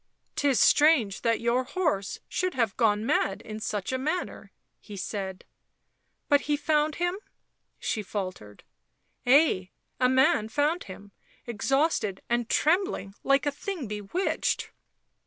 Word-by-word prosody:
" - - -47
'Tis 280 -3 +2
strange 290 -10 +4
that 230 -1 +1
your 235 +2 +1
horse 280 - -1
should 370 -1 -2
have 230 -6 0
gone 215 -2 +2
mad 195 -4 +1
in 215 0 -7
such 210 -1 -3
a 260 - -1
manner," 310 +7 -3 0.3
he 205 -2 -10
said. 190 -1 -5 0.4
" - - -49
But 285 -1 +4
he 295 - +3
found 300 0 +1
him 350 0 0
1 390 - -7 0.3
?" - - -49
she 220 - -2
faltered. 185 - -6 0.4
" - - -45
Ay, 250 - +4 0.3
a 250 0 +4
man 260 -4 +3
found 295 +7 0
him, 200 +1 -11 0.3
exhausted 235 - 0
and 240 -1 0
trembling 345 - +1
like 275 0 +3
a 290 - +1
thing 315 - -5
bewitched." 210 - -2
250 Hz, 150 wpm, -27 LUFS, 205-300 Hz, 0.4 s, strange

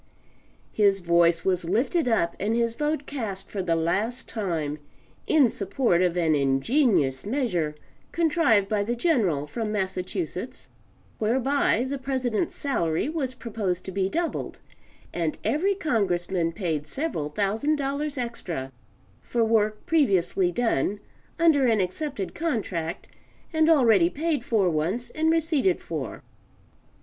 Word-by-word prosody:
His 200 -2 +3
voice 170 -1 +3
was 185 -2 +1
lifted 250 - +1
up 195 -8 +1
and 215 +3 0
his 235 -1 +1
vote 295 +2 -1
cast 220 -10 -5
for 200 - -2
the 170 -2 +1
last 200 +9 -1
time, 160 -9 -3 0.5
in 300 -5 +5
support 200 -3 0
of 180 -1 +1
an 165 -3 +3
ingenious 140 - +2
measure 200 - -1 0.4
contrived 310 - +3
by 210 -1 0
the 235 +4 -2
General 220 - +1
from 220 +7 -4
Massachusetts 190 - -4 0.5
whereby 250 +2 +2
the 280 +1 -3
President's 260 +1 -1
salary 170 - -1
was 275 -5 -3
proposed 215 -7 -3
to 190 - -5
be 190 0 0
doubled 335 - -3 0.5
and 165 -3 -1
every 385 +7 +1
Congressman 190 - 0
paid 165 -5 -3
several 215 - -3
thousand 215 - 0
dollars 285 +1 -2
extra 180 - -4 0.5
for 235 -1 0
work 215 -1 +1
previously 195 - +2
done, 205 - 0 0.4
under 315 -6 +4
an 225 -3 +3
accepted 195 - -3
contract, 195 - -3 0.5
and 315 0 +3
already 225 - +5
paid 300 - -1
for 215 -6 +2
once 175 +9 -1
and 315 +1 +1
receipted 330 +1 +2
for. - - -6
220 Hz, 130 wpm, -26 LUFS, 175-280 Hz, 0.5 s, in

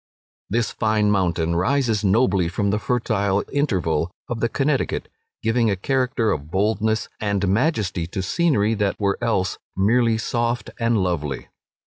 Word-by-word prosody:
This 115 +2 0
fine 110 -1 +1
mountain 85 -4 +1
rises 110 +3 +1
nobly 95 -4 +3
from 100 +3 0
the 105 - 0
fertile 100 -3 0
Interval 90 - 0 0.2
of 120 -2 -3
the 115 - +1
Connecticut, 135 +2 0 0.4
giving 115 0 +2
a 100 - +1
character 125 +2 0
of 75 0 -3
boldness 110 +3 0
and 100 -2 0
majesty 100 - 0
to 95 +2 -4
scenery 115 - +2
that 105 -2 -1
were 100 -1 0
else 95 -5 0 0.2
merely 115 +3 +3
soft 120 +1 -1
and 115 -1 +2
lovely. 75 -7 -3
105 Hz, 140 wpm, -22 LUFS, 95-120 Hz, 0.4 s, nobly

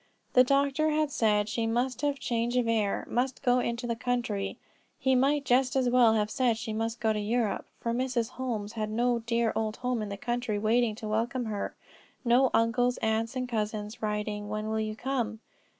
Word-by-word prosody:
The 250 - +7
doctor 280 +3 +2
had 305 -1 +1
said 210 -4 +2
she 225 +1 -1
must 245 +3 0
have 290 -1 0
change 240 -1 -1
of 245 -2 +2
air, 215 -3 0
must 255 +3 -1
go 250 -1 +4
into 235 0 -2
the 235 -1 -1
country. 225 -5 -2 0.4
He 265 0 +2
might 275 +3 +2
just 255 +1 +3
as 255 -2 +3
well 240 -2 +5
have 210 0 0
said 250 -5 +2
she 220 -1 -4
must 225 +1 -2
go 220 -1 +2
to 210 - -2
Europe, 220 0 -1
for 230 - -2
Mrs. 245 -2 0
Holmes 230 -5 -4
had 215 -2 -2
no 240 +2 +1
dear 230 0 0
old 220 -1 -1
home 250 -2 -1
in 210 - -4
the 200 - -5
country 240 -1 -2
waiting 220 +1 +2
to 215 - -7
welcome 235 +3 -1
her; 210 -2 -3 0.5
no 250 +2 +5
uncles, 245 +2 +2
aunts 225 +2 -1
and 255 -1 -2
cousins, 215 -1 -3
writing 210 -1 -2
"When 215 +1 -3
will 220 0 0
you 215 0 -2
come?" 240 -3 -2
235 Hz, 200 wpm, -29 LUFS, 215-250 Hz, 0.5 s, The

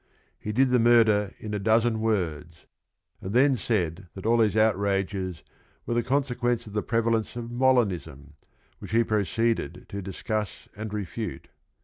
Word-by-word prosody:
"He 105 - -4
did 130 +4 +3
the 125 - +4
murder 110 -4 +4
in 105 -1 -7
a 105 - -1
dozen 110 +2 +2
words," 85 -7 -2 0.6
and 95 - -5
then 135 +2 +5
said 95 -5 -2
that 95 - -8
all 115 +1 +4
these 110 -2 +3
outrages 95 -4 0 0.4
were - - -2
the 120 - +2
con 135 +4 +1
sequence 120 -2 -1
of 105 - -11
the 105 - 0
prevalence 115 0 0
of 120 -1 -6
Molinism, 105 - 0 0.5
which - - -9
he 115 +1 +4
proceeded 110 -4 -1
to 100 - -5
discuss 100 +3 -4
and 110 +1 -6
refute. 105 - -5
110 Hz, 155 wpm, -26 LUFS, 100-115 Hz, 0.6 s, then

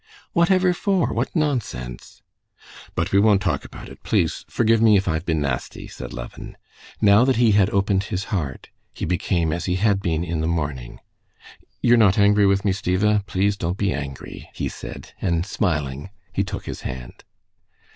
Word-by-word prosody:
"What 170 -2 +3
ever 185 -1 +4
for? 190 -1 0
What - - -2
nonsense!" 100 - -3 0.7
"But 80 +3 -1
we 100 - +4
won't 105 -1 +5
talk 85 -9 -1
about - - -10
it. - - -13
Please - - 0
forgive 115 -1 +2
me, 110 -3 +6
if 95 - -1
I've 85 +1 -1
been 80 -2 +1
nasty," 65 -3 -3
said - - -8
Levin. - - -8 0.4
Now 100 +2 +6
that 130 0 +2
he 115 -1 +4
had 100 -1 +4
opened 100 -1 +1
his 95 0 -3
heart, 75 -9 -3 0.3
he - - -3
became 85 -1 0
as 85 0 -3
he 90 - 0
had 100 0 +2
been 85 -3 -1
in 85 -2 -2
the 80 - 0
morning. 75 -7 -3 0.8
"You're 120 0 +5
not 100 -4 +4
angry 100 0 +5
with 100 +1 +1
me, 100 - +3
Stiva? 100 +2 +1
Please 100 +2 +1
don't 90 -1 -3
be 100 -2 0
angry," 70 -2 -7
he - - -2
said, - - -9
and 85 -1 0
smiling, 75 -7 -2 0.2
he 100 - +1
took 95 - -6
his - - -6
hand. 60 -2 -7
95 Hz, 180 wpm, -22 LUFS, 80-105 Hz, 0.8 s, me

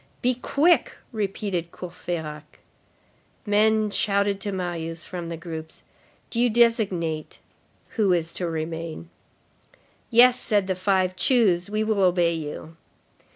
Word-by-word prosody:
"Be 250 +1 +3
quick," 290 +7 +2 0.2
repeated 195 -5 -3
Courfeyrac. 160 -4 -7 0.9
Men 215 0 +3
shouted 200 -1 0
to 205 - -2
Marius 170 -3 -4
from 175 -2 -6
the 165 - -5
groups: 160 -2 -8 0.5
"Do 230 - -2
you 245 0 +4
designate 200 -9 +1 0.5
who 210 -5 +1
is 170 -2 0
to 175 -2 -3
remain." 160 - -5 1.0
"Yes," 245 +2 +6
said 205 -3 +1
the 190 - 0
five, 185 0 +1
"choose. 195 -6 +2
We 215 +1 0
will 215 -2 0
obey 175 -2 +3
you." 160 0 -7
185 Hz, 120 wpm, -24 LUFS, 165-215 Hz, 1.0 s, Yes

